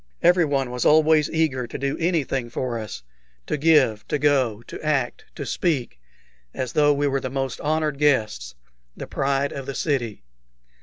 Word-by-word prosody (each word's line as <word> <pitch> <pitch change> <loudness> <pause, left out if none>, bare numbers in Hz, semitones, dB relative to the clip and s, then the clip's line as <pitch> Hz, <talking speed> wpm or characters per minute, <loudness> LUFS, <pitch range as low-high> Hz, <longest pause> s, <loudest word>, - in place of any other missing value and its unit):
Everyone 150 -7 +3
was 125 -1 -2
always 155 -1 +4
eager 140 -6 0
to - - -6
do 140 +1 -2
anything 150 -8 0
for 120 0 -3
us 105 - -7 0.4
to - - -1
give, 140 -9 +3
to 150 - 0
go, 130 -6 +1
to - - -10
act, 135 -5 -1
to 140 - -5
speak, 130 - -1 0.5
as 130 -2 -3
though 145 -1 +4
we 145 0 +1
were 135 -1 +1
the 130 - -3
most 135 -1 -3
honored 155 -1 0
of - - -16
guests, 110 - +1 0.4
the - - -6
pride 140 +1 -1
of 135 -1 -6
the 140 - -4
city. 120 - -2
140 Hz, 170 wpm, -23 LUFS, 125-150 Hz, 0.5 s, always